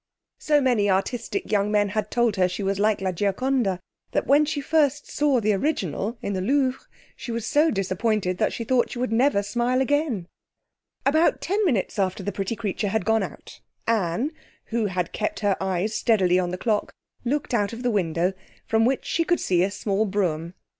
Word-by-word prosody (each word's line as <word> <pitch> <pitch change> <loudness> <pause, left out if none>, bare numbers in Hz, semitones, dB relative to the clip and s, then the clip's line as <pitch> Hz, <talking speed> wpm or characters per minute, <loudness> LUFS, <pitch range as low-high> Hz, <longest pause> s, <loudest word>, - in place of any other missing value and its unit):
So 295 -1 +3
many 235 -6 +2
artistic 235 - -1
young 205 0 +2
men 205 -1 +2
had 215 +2 -2
told 240 -3 +1
her 185 -1 +3
she 180 +3 -4
was 195 0 -1
like 210 -1 +2
La 190 -1 0
Gioconda, 205 +2 0 0.3
that - - +1
when 285 +4 +5
she 295 0 -2
first 290 -1 +1
saw 290 -4 +2
the 215 -1 +2
original 205 - -1
in 200 - -2
the 185 - -2
Louvre 265 +4 +1 0.3
she 260 -2 -7
was 230 -1 -3
so 305 +3 +3
disappointed 195 - -1
that - - +2
she 230 - -4
thought 245 +1 +2
she - - -7
would 250 -1 -1
never 230 -2 +3
smile 240 +4 0
again. 265 - 0 0.8
About 315 +4 +3
ten 405 +4 0
minutes 225 - 0
after 185 -1 0
the 205 - -2
pretty 195 +3 -3
creature 210 -1 -2
had 220 -1 -1
gone 225 0 +3
out, - - -8 0.2
Anne, 225 - 0 0.4
who 225 -2 +1
had 180 -2 -2
kept 210 - -2
her 200 -2 +2
eyes 190 +3 -1
steadily 185 -6 +3
on 180 -1 -1
the 180 - -4
clock, 215 +1 -1 0.3
looked 275 +2 -1
out 205 -4 +1
of 235 +2 -7
the 245 - +1
window, 180 -2 0 0.3
from 225 0 +2
which 260 +2 0
she 335 - +1
could 345 +1 +1
see 175 -2 +1
a 190 - +2
small 200 +1 -1
brougham 185 -6 0
driving 170 +2 -9
up. - - -46
215 Hz, 200 wpm, -24 LUFS, 195-255 Hz, 0.8 s, when